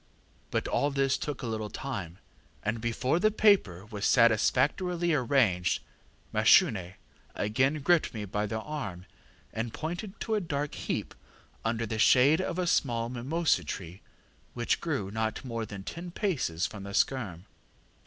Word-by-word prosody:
But - - -1
all 145 - +1
this 135 -1 +1
took 145 -3 -4
a - - -2
little 110 -2 -3
time, 100 -9 -5 0.5
and 110 +1 -2
before 125 +7 0
the 215 - +4
paper 200 - +3
was 105 -1 -2
satisfactorily 145 - +3
arranged, 120 - +2 0.5
Mashune 110 - +4 0.4
again 130 +8 +1
gripped 175 +1 +3
me 105 -2 -5
by 105 +2 -2
the 110 +2 -3
arm, 105 -12 -5 0.5
and 115 0 -3
pointed 175 +6 -5
to 225 - -2
a 210 - +2
dark 145 -4 -3
heap - - -3 0.5
under 115 0 -1
the 110 0 -4
shade 135 +8 +5
of 185 -2 -3
a 180 - 0
small 120 -8 +1
mimosa 140 +7 0
tree 90 0 -7 0.5
which 120 -1 0
grew 135 - -2
not 110 +3 -2
more 115 -3 -3
than 100 -1 -8
ten 170 - -6
paces 150 - -1
from 105 -2 -6
the 100 0 -6
skerm. 100 -10 0
120 Hz, 150 wpm, -29 LUFS, 105-155 Hz, 0.5 s, shade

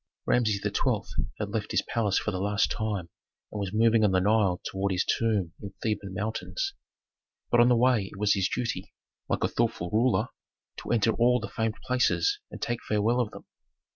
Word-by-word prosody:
Rameses 110 -5 +2
XII. - - -1
had - - -3
left - - -3
his - - +1
palace 105 -4 0
for 110 - -1
the 95 -2 -3
last 100 +1 +1
time 105 -6 -2 0.4
and 105 - -5
was 100 -2 -3
moving 115 +1 +4
on 105 - +5
the 95 - +3
Nile 100 -2 +2
toward 95 +1 -1
his 90 - +1
tomb 105 -7 0
in 100 -2 -8
Theban 105 -3 -2
mountains. 95 -4 -3 0.8
But 120 - +4
on 120 +1 +6
the 125 - +5
way 115 -5 +3
it - - -11
was 105 0 +3
his 95 -1 +1
duty, 115 -7 -3 0.3
like - - 0
a - - +4
thoughtful 115 -7 -1
ruler, 115 +3 +2 0.5
to - - -8
enter 115 -1 +3
all 125 +2 +3
the 115 - -6
famed 110 -1 -1
places 265 - +2
and - - -9
take 120 0 -2
farewell 110 +3 +1
of 120 -4 +1
them. - - -12
110 Hz, 195 wpm, -28 LUFS, 100-115 Hz, 0.8 s, on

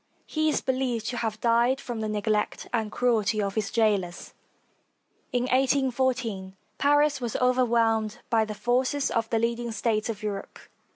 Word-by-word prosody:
He 310 0 0
is - - 0
believed 255 -4 -1
to 245 - -4
have 220 -2 -2
died 240 +3 +3
from 240 -4 -5
the 215 -1 -2
neglect 210 0 -1
and 220 -3 -1
cruelty 225 -3 +1
of 200 -1 -1
his 215 -1 -1
jailers. 205 -6 0 1.0
In 245 0 0
1 255 - -1
8 265 0 +2
14, 235 -7 -1 0.2
Paris 290 0 +3
was 235 -2 -3
overwhelmed 230 -4 +2
by 225 -1 +4
the 215 -1 -5
forces 255 +5 0
of 225 -1 -1
the 230 - +1
leading 235 +1 -1
States 220 -1 -1
of 215 -1 -5
Europe. 200 -2 -5
230 Hz, 165 wpm, -26 LUFS, 215-255 Hz, 1.0 s, by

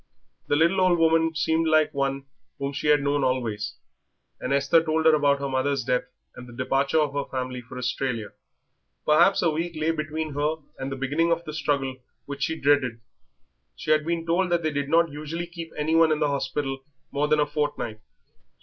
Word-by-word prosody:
The - - +2
little 170 +5 +3
old 180 -2 +4
woman 165 0 +3
seemed 160 0 +1
like 155 -1 +3
one 135 -1 -1 0.3
whom 140 0 -3
she 140 - -3
had 150 -1 +4
known 145 0 +1
always, 115 -6 -1 0.6
and 130 - -4
Esther 140 +4 +4
told 160 0 0
her 160 - +7
about 145 -2 +3
her 140 0 -3
mother's 135 0 0
death 125 +1 0 0.3
and 125 - -10
the 120 - -12
departure 135 +4 0
of 150 -2 +1
her 140 0 -2
family 125 -1 -4
for 125 +1 -11
Australia. 125 -3 -2 0.8
Perhaps 155 +6 +4
a 165 - +3
week 165 +2 -3
lay 155 +1 +1
between 155 -1 -3
her 150 +2 0 0.2
and 135 +1 -4
the - - -2
beginning 145 +6 0
of 170 0 0
the 155 - -6
struggle 140 -3 -1 0.3
which 140 0 -7
she 160 +2 -1
dreaded. 135 -5 +2 0.8
She 155 - -3
had 155 0 +4
been 165 +1 -2
told 180 +3 +1
that 170 -1 +1
they 155 - 0
did 145 -1 -2
not 165 0 +3
usually 155 +4 -5
keep 170 -1 -8
anyone 160 +2 +3
in 155 - +2
the 150 -2 +2
hospital 140 -1 -2 0.3
more 145 +1 0
than 155 0 +3
a 150 - +4
fortnight. 145 -7 -3
145 Hz, 195 wpm, -25 LUFS, 135-160 Hz, 0.8 s, her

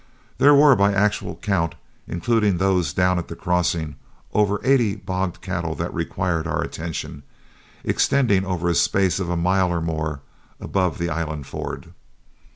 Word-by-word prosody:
There 145 +1 +7
were 140 -1 +7
by 100 +1 +3
actual 105 +1 0
count, 85 -6 -1 0.3
including 105 +1 +1
those 95 -2 +1
down 90 0 +2
at 85 - -6
the 85 - -7
crossing, 85 -3 -1 0.4
over 105 -1 +2
eighty 120 -7 +3
bogged 95 -2 -3
cattle 85 -4 -3
that - - -4
required 85 -3 -2
our 85 0 -1
attention, 80 -3 -6 0.6
extending 115 -9 +2
over 90 -2 -2
a 85 - +2
space 95 +2 +2
of 90 -3 -3
a 85 - 0
mile 90 +1 +2
or 85 - 0
more 80 -3 -3 0.4
above 95 -3 -1
the 85 0 -2
island 80 -3 -3
ford. - - -7
90 Hz, 155 wpm, -22 LUFS, 85-100 Hz, 0.6 s, There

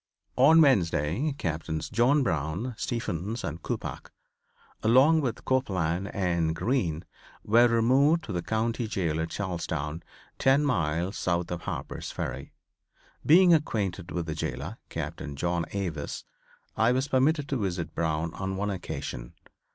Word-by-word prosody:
On 150 +6 +6
Wednesday 100 - +2
Captains 80 - -3
John 130 +6 +3
Brown, 90 - -2
Stephens 110 -1 -3
and 85 +1 -4
Coppoc, - - -5 0.7
along 135 +8 +5
with 120 -5 -3
Copeland 95 -8 0
and 85 -4 0
Green, 85 - -1 0.4
were 120 +3 +5
removed 130 +8 +3
to - - -6
the 90 - -1
county 115 +4 -1
jail 85 -7 -1
at 80 - -3
Charlestown, 80 -5 -3 0.4
ten 135 +2 +4
miles 85 - 0
south 85 -1 -1
of 85 -1 -3
Harper's - - -5
Ferry. 65 +2 -5 0.7
Being 175 +3 +7
acquainted 100 - 0
with 85 -2 -3
the 80 - -3
jailor, 80 - -4
Captain 70 - -5
John 85 +3 -1
Avis, 85 -7 -4 0.5
I 110 +2 +3
was 130 +2 0
permitted 145 +2 +2
to 135 - 0
visit 90 -6 -3
Brown 80 0 -1
on 95 0 -4
one 100 +1 -1
occasion. 75 -9 -6
95 Hz, 135 wpm, -28 LUFS, 85-125 Hz, 0.7 s, Being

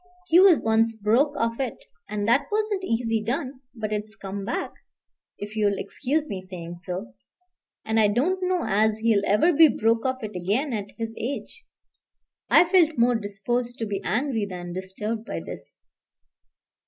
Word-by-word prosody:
He 350 0 +5
was 375 -4 +7
once 225 0 +2
broke 235 +8 +2
of 230 +1 -1
it, 260 -5 -2 0.3
and 205 0 -2
that 275 +5 +3
wasn't 420 -2 0
easy 225 - 0
done; 255 +3 -3
but 215 -2 -3
it's 210 0 -4
come 195 0 -6
back, 230 - -3 0.6
if 210 +1 -7
you'll 205 -2 +1
excuse 300 +3 -2
me 195 -8 -5
saying 175 -2 -8
so. 175 - -6 0.7
And 220 0 +1
I 215 - +5
don't 295 - +1
know 365 -1 0
as 215 +2 +2
he'll 220 -2 +2
ever 220 - +4
be 320 +2 +8
broke 225 -3 +1
of 260 -2 -3
it 215 -2 -6
again 210 - -1
at 205 -2 -3
his 225 -1 -4
age." 285 - -5 0.8
I - - +7
felt 340 -4 +3
more 240 +1 +4
disposed 235 +3 -2
to 225 - -2
be 200 -2 -3
angry 230 -3 -1
than 175 -1 -6
disturbed 210 +4 -4
by - - -5
this. - - -10
225 Hz, 165 wpm, -25 LUFS, 205-275 Hz, 0.8 s, be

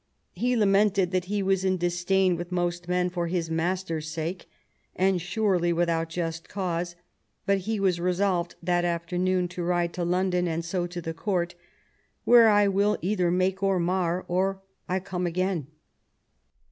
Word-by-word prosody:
He 245 +7 0
lamented 200 -3 +3
that 185 -1 0
he 200 +1 -1
was 190 -1 +1
in 185 -1 +1
dis 175 0 -2
dain 190 -1 +3
with 175 +1 -6
most 175 -1 -1
men 180 0 +1
for 175 -1 -2
his 165 -2 -2
master's 165 -1 -2
sake, 165 +3 -5 0.5
and 185 -1 +2
surely 185 -2 +1
without 165 -1 0
just 165 -1 -4
cause; 175 -3 -3 0.5
but 200 0 +2
he 220 -2 0
was 185 -3 +1
resolved 180 0 0
that 175 0 +1
afternoon 180 +2 0
to 180 0 -6
ride 175 0 0
to 180 - -3
London, 180 0 +1
and 165 0 -2
so 175 0 -1
to 175 0 -6
the 165 0 -4
Court, 175 -1 -1 0.4
" - - -42
where 235 -2 +7
I 205 -1 +5
will 200 +2 +2
either 185 -2 +1
make 185 +2 +1
or 195 -2 +2
mar, 180 0 0
or 190 +2 0 0.3
I 185 +1 +1
come 185 -1 -3
again." 180 -4 -1
180 Hz, 170 wpm, -26 LUFS, 175-190 Hz, 0.5 s, where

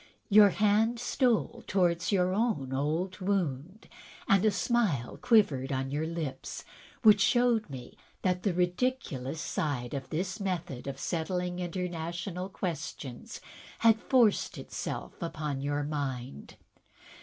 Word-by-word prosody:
Your 205 0 +8
hand 215 +4 +2
stole 240 -1 +1
towards 175 -2 +1
your 185 -2 +2
own 195 - 0
old 160 +8 -1
wound, 185 -2 -2 0.4
and 195 -1 +4
a 215 - +5
smile 200 - 0
quivered 145 - +3
on 135 0 -2
your 150 +3 -1
lips, 165 -5 -5 0.4
which 210 -3 +7
showed 240 -3 +3
me 130 -3 -9 0.3
that 180 -1 +1
the 200 - +1
ridiculous 180 - -1
side 145 -6 -2
of 135 -2 -5
this 185 +4 -3
method 175 -10 -3
of 135 -1 -5
settling 180 +2 -2
international 175 +1 -4
questions 155 -9 -5 0.4
had 225 -1 +4
forced 240 -6 +3
itself - - -5
upon 150 -4 -3
your 145 +1 -1
mind. 130 - -4
180 Hz, 120 wpm, -30 LUFS, 145-205 Hz, 0.4 s, Your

